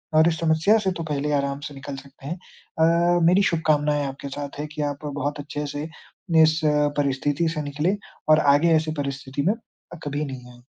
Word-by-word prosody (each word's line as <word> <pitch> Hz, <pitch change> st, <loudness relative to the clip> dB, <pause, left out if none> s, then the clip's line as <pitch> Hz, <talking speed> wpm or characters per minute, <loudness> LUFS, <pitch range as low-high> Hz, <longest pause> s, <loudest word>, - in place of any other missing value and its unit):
और 160 Hz, +1 st, +6 dB
इस 160 Hz, -, -3 dB
समस्या 165 Hz, +6 st, +3 dB
से -, -, +3 dB
तो -, -, -2 dB
पहले 145 Hz, +1 st, -1 dB
आराम 140 Hz, 0 st, 0 dB
से -, -, -12 dB
निकल 135 Hz, 0 st, -7 dB
सकते 135 Hz, 0 st, -12 dB
हैं। 170 Hz, -, -2 dB, 0.4 s
अ, 170 Hz, +2 st, +4 dB
मेरी 185 Hz, +3 st, +5 dB
शुभकामनाएँ 150 Hz, -3 st, +1 dB
आपके 135 Hz, +1 st, -7 dB
साथ 145 Hz, 0 st, -6 dB
हैं 150 Hz, -, -3 dB
कि 155 Hz, -, -3 dB
आप 145 Hz, +2 st, -9 dB
बहुत 145 Hz, 0 st, -3 dB
अच्छे 145 Hz, 0 st, -4 dB
से 145 Hz, -, -3 dB, 0.6 s
इस 155 Hz, +1 st, +3 dB
अ, 150 Hz, -1 st, +3 dB
परिस्थिति 145 Hz, +3 st, +1 dB
से 150 Hz, -, -1 dB
निकलें 150 Hz, +8 st, -1 dB, 0.3 s
और 155 Hz, -, +7 dB, 0.2 s
आगे 165 Hz, +3 st, +3 dB
ऐसे 155 Hz, 0 st, +1 dB
परिस्थिति 140 Hz, 0 st, -4 dB
में 205 Hz, -, +4 dB
अ, 225 Hz, -6 st, -16 dB
कभी 145 Hz, +1 st, -2 dB
नहीं 125 Hz, -3 st, -8 dB
आएँ। 120 Hz, 0 st, -18 dB
150 Hz, 200 wpm, -24 LUFS, 140-160 Hz, 0.6 s, और